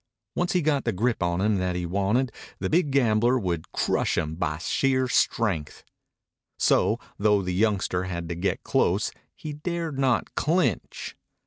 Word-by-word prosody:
Once 175 0 0
he 180 -3 +2
got 145 -3 +1
the - - 0
grip 115 +4 0
on 85 0 0
him 105 -1 +2
that 90 -1 -1
he 90 -1 -2
wanted 100 +8 +1 0.3
the - - -3
big 160 -2 +3
gambler 120 -2 +3
would 90 -8 -3
crush - - 0
him 75 0 -1
by 80 -2 -2
sheer 130 - +1
strength. 100 -10 0 0.7
So, - - +3 0.2
though 105 -1 +3
the 90 0 -2
youngster 95 -2 +1
had 85 -2 -4
to - - -1
get 95 +3 -1
close, - - +1 0.2
he 150 - -6
dared 165 -1 -3
not 130 -4 +1
clinch. 155 - -1
110 Hz, 160 wpm, -26 LUFS, 90-135 Hz, 0.7 s, big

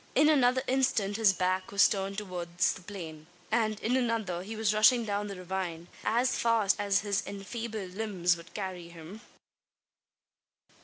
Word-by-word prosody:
In 300 - +5
another 260 -3 +3
instant 230 -6 +1
his 220 -3 +5
back 185 0 -1
was 200 0 +6
turned 195 -1 -3
towards 180 -3 -1
the - - -11
plain; 165 -5 -9 0.2
and, 215 -2 +1
in 245 +3 +1
another, 225 -8 -1
he 215 +4 -7
was 215 -1 +1
rushing 225 +2 +5
down 205 0 -2
the 200 - -6
ravine, 180 -2 -5
as 245 +3 +1
fast 225 -4 +3
as 200 -1 +2
his 205 -2 0
enfeebled 205 -1 -6
limbs 190 -4 0
would 170 +1 -13
carry 185 -4 -5
him! 170 +5 -11
200 Hz, 155 wpm, -30 LUFS, 180-225 Hz, 0.2 s, was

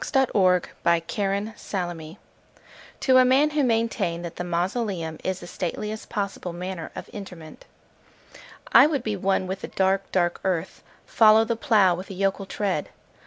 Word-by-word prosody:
The 270 - +2
Traveller 185 -6 +3 0.2
heart 180 -1 -2 0.8
(To 260 -1 +5
a - - +7
Man 265 +4 +4
who 295 -1 +1
maintained 225 -8 0
that 170 -1 -7
the - - -3
Mausoleum 175 -1 -2
is 185 -1 -2
the - - -8
Stateliest 210 +5 -5
Possible 195 -3 -4
Manner 180 -1 -5
of - - -7
Interment) 180 -6 -10 1.1
I - - +9
would 285 -6 -2
be 215 -3 -2
one 190 0 0
with 190 +1 -5
the - - -5
dark, 190 0 0
dark 175 -2 +1
earth:— 180 -4 -2 0.2
Follow 220 0 +5
the 230 0 -1
plough 220 -8 +3
with 185 +2 -7
a 195 - -7
yokel 195 +1 -1
tread. 195 -8 -2
195 Hz, 155 wpm, -24 LUFS, 175-220 Hz, 1.1 s, I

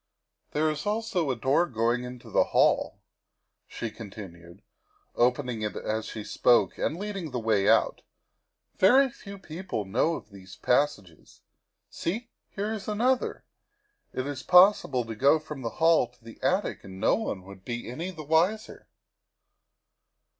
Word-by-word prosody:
" - - -51
There 155 +1 +2
is 150 +5 -5
also 210 -7 -1
a 130 - +1
door 135 +8 +2
going 120 0 0
into 125 -1 -10
the - - +4
hall," - - +2 0.7
she 115 - -5
con 110 -1 -9
tinued, 85 -3 -11 0.5
opening 125 -1 +1
it 105 -1 -3
as 110 0 -3
she 110 - -6
spoke 120 +3 +3
and 160 - -1
leading 195 -4 -5
the 125 - -3
way 110 -3 +2
out. - - +3 0.4
" - - -48
Very 265 +8 +6
few 200 -3 -11
people 175 - -5
know 125 +12 +1
of 110 - -10
these 95 -1 -12
passages. 125 - -1 0.5
See, 225 +8 -4 0.2
here 210 +2 -3
is 205 -3 -6
another. 245 +5 0 0.7
It 130 - -3
is 140 -2 -4
possible 180 - +5
to 115 - -5
go 135 +8 +4
from 150 -3 -8
the 115 - -2
hall 165 -5 +4
to 125 0 -29
the 115 0 -13
attic 185 +3 0
and 95 -1 -10
no - - +3
one 105 - -2
would 95 0 -13
be 120 +2 -5
any 160 +10 -5
the 160 -4 -8
wiser. 170 +8 0
135 Hz, 160 wpm, -27 LUFS, 115-185 Hz, 0.7 s, Very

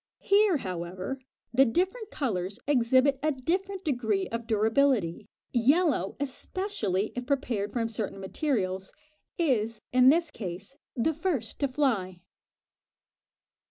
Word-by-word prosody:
Here, 400 -4 +4
however, 185 +4 -5 0.3
the 265 +3 +6
different 375 - 0
colours 200 -8 -2
exhibit 265 0 +3
a 310 +1 +2
different 370 +8 -2
degree 220 -9 0
of 230 0 -4
durability; 220 -4 +2 0.3
yellow, 270 - +3
especially 265 - -2
if 245 0 -4
prepared 245 -7 0
from 230 -2 -1
certain 215 -3 -3
materials, 190 -3 -2 0.4
is, 230 - 0
in 255 0 +7
this 330 +1 +3
case, 195 +3 -6 0.2
the 280 +6 +1
first 305 - -2
to 280 - +2
fly. 225 -10 0
250 Hz, 115 wpm, -28 LUFS, 205-295 Hz, 0.4 s, in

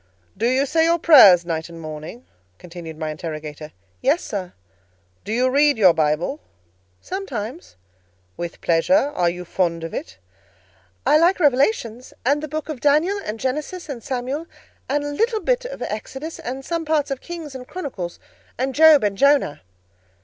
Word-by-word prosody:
"Do 225 +4 0
you 260 +3 +2
say 320 +3 +2
your 335 +1 +3
prayers 205 - +8
night 165 -1 -3
and 165 -1 -10
morning?" 155 +9 -8 0.3
continued 170 -3 -10
my 155 -1 -3
interrogator. 155 -1 -7 0.3
"Yes, 285 +7 +2
sir." 190 -4 -5 0.7
"Do - - -6
you 245 +3 +2
read 285 +1 +3
your 190 -5 +6
Bible?" 160 - 0 0.6
"Sometimes." 290 - -6 0.6
"With 170 -1 -6
pleasure? 275 - +2
Are 175 -1 +2
you 180 +1 -6
fond 170 -2 -1
of 165 - -6
it?" 95 +1 -6 0.9
"I 305 - +5
like 350 +4 +3
Revelations, 255 - +1
and 285 +3 +2
the 310 - -4
book 310 +1 -4
of 305 -5 -5
Daniel, 305 +9 +2
and 215 +1 -5
Genesis 300 +7 -4
and 255 -5 -5
Samuel, 260 +7 -4 0.4
and 290 +2 0
a 290 - -3
little 450 +9 0
bit - - 0
of - - -6
Exodus, 265 +9 -6
and 265 +2 -6
some 335 -1 -2
parts 310 -3 0
of 270 - -3
Kings 330 -5 -8
and 255 -1 -9
Chronicles, 245 - -6 0.4
and 265 +2 -1
Job 310 -1 +7
and 205 -1 0
Jonah." 280 - +3
260 Hz, 165 wpm, -22 LUFS, -, 0.9 s, prayers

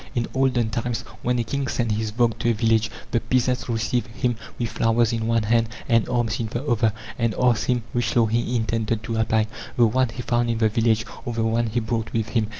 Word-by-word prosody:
In 120 -1 +1
olden 130 -4 +1
times, 115 +1 -2 0.2
when 125 0 0
a 120 - +1
king 140 +4 -2
sent 115 -3 -1
his 110 0 -1
vogt 115 0 +1
to 120 - +1
a - - +4
village, 110 0 +2 0.2
the 120 - +2
peasants 125 +1 0
received 115 +1 0
him 120 +1 -1 0.2
with 120 -2 -2
flowers 115 0 +2
in 115 -1 -1
one 115 -1 +2
hand 115 +1 +2 0.2
and 115 -3 +3
arms 120 -4 0
in 115 - -1
the 120 +5 -4
other, 115 -5 +2 0.3
and 115 -2 +1
asked 125 -3 +3
him 125 -2 +1
which 120 -1 0
law 120 -2 +5
he 120 +2 0
intended 110 -1 -1
to 115 +1 -3
apply: 110 -1 +2 0.3
the 120 - +6
one 125 +3 +2
he 125 +2 -6
found 120 -2 +1
in 115 - 0
the 110 -1 +3
village, 110 0 +2 0.2
or 120 - -4
the 115 0 0
one 115 +1 +1
he 115 +2 0
brought 115 -1 -3
with 110 -2 -1
him? 110 -3 +1
115 Hz, 235 wpm, -23 LUFS, 110-120 Hz, 0.3 s, the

